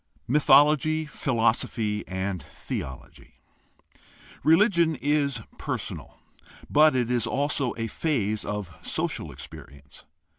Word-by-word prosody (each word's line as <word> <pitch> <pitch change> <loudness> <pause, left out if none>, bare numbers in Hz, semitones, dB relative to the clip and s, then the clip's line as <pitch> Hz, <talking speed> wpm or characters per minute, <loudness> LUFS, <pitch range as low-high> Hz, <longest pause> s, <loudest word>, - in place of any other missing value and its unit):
Mythology, 150 +3 +4
philosophy, 115 -6 0
and 95 -1 -3
theology. 65 -1 -8 0.5
— 65 +2 -24
Religion 165 - +4
is 140 -3 0 0.2
per - - -2
sonal, - - -7 0.6
but 155 -1 +5
it 125 -1 0
is 120 -2 +1
also 140 +1 -1
a 115 - -2
phase 110 -4 -1
of 105 -4 -5
social - - -3
experience. 70 0 -12
125 Hz, 105 wpm, -26 LUFS, 105-150 Hz, 0.6 s, but